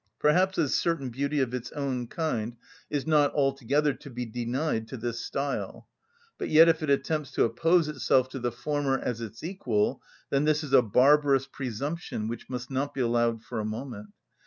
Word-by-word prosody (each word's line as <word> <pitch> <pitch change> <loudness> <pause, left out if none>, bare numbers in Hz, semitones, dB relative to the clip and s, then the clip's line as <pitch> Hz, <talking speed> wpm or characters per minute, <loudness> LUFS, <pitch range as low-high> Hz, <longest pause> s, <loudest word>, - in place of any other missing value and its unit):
Perhaps 185 +5 +3
a 160 - +2
certain 140 -3 0
beauty 140 +4 -1
of 125 -2 -1
its 125 0 -4
own 130 -4 -2
kind 120 -7 -2 0.3
is 145 -2 -2
not 150 -3 +4
altogether 140 +1 +1
to 140 - -12
be 125 -1 -4
denied 120 +1 -2
to 130 - -7
this 115 0 -3
style, 140 0 -4 0.5
but - - -3
yet 160 +2 +8
if 165 -1 +3
it 155 - -2
attempts 145 0 0
to - - +3
oppose 165 +6 +3
itself 130 -3 +2
to 135 - -6
the 120 0 -1
former 140 +2 -1
as 120 -3 -3
its 115 +2 -8
equal, 130 - -1 0.3
then 140 +1 +2
this 155 0 +2
is 140 -2 -6
a 130 - +8
barbarous 135 +4 +4
presumption 135 -1 -4
which 115 0 -6
must 125 0 -5
not 135 +2 -2
be 135 - -1
allowed 120 -1 +1
for 115 -1 -5
a - - -2
moment. 110 0 -5
135 Hz, 185 wpm, -28 LUFS, 120-150 Hz, 0.5 s, yet